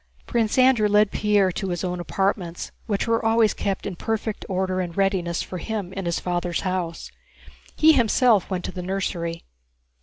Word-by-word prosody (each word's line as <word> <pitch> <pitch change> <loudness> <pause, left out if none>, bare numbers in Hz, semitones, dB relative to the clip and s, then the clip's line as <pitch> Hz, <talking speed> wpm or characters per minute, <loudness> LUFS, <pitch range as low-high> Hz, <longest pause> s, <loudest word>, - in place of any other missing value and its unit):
Prince 230 -1 0
Andrew 255 -4 +5
led 210 0 +4
Pierre 205 -3 +2
to 195 +2 -4
his 175 0 -3
own 180 -1 -2
apartments, 180 -1 -2 0.2
which 205 -3 0
were 230 0 +1
always 225 -1 +3
kept 195 -1 -3
in 195 - -4
perfect 220 +2 -3
order 185 0 0
and 175 -1 -6
readiness 190 -4 0
for 180 - -6
him 200 -2 -4
in 195 -1 -4
his 170 -1 0
father's 175 -1 -2
house; 185 -3 -3 0.6
he 315 0 +6
himself 235 -4 +3
went 185 -2 -3
to - - -4
the 180 - -6
nursery. 175 -3 -3
195 Hz, 175 wpm, -24 LUFS, 180-215 Hz, 0.6 s, he